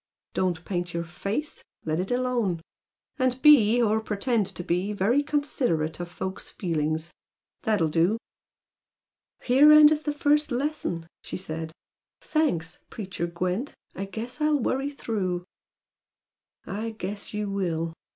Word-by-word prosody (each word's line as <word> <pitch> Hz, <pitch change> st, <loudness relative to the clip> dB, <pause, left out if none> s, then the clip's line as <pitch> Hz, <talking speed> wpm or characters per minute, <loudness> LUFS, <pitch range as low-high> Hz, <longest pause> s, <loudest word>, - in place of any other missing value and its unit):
Don't 175 Hz, -2 st, -1 dB
paint 175 Hz, -2 st, -3 dB
your 170 Hz, -, -1 dB
face, 200 Hz, -, -4 dB, 0.2 s
let 155 Hz, +1 st, 0 dB
it 185 Hz, -, -2 dB
alone. 245 Hz, -8 st, 0 dB, 0.6 s
And 255 Hz, 0 st, +1 dB
be, 245 Hz, -7 st, +7 dB
or 220 Hz, -2 st, +3 dB
pretend 220 Hz, 0 st, 0 dB
to 195 Hz, -2 st, -6 dB
be, 180 Hz, +5 st, 0 dB
very 210 Hz, +8 st, +3 dB
considerate 245 Hz, -, 0 dB
of 175 Hz, 0 st, -5 dB
folks' 190 Hz, +2 st, -5 dB
feelings. 160 Hz, -2 st, -2 dB, 0.5 s
That'll 210 Hz, -7 st, +2 dB
do!" 170 Hz, +7 st, +2 dB, 1.3 s
"Here 275 Hz, +5 st, +7 dB
endeth 305 Hz, 0 st, +7 dB
the 295 Hz, -, +1 dB
first 295 Hz, +1 st, +2 dB
lesson!" 245 Hz, -, -2 dB, 0.2 s
she -, -, -6 dB
said. 160 Hz, -3 st, -5 dB, 0.5 s
"Thanks, 175 Hz, -, 0 dB
preacher 185 Hz, -5 st, -4 dB
Gwent! 180 Hz, +9 st, -2 dB, 0.2 s
I 195 Hz, -, -4 dB
guess 230 Hz, +8 st, -6 dB
I'll 300 Hz, 0 st, +3 dB
worry 270 Hz, +3 st, 0 dB
through!" 190 Hz, -10 st, -2 dB, 1.2 s
"I 220 Hz, +3 st, -4 dB
guess 200 Hz, +1 st, -5 dB
you 210 Hz, -1 st, -2 dB
will!" 165 Hz, -4 st, -1 dB
200 Hz, 130 wpm, -26 LUFS, 175-255 Hz, 1.3 s, be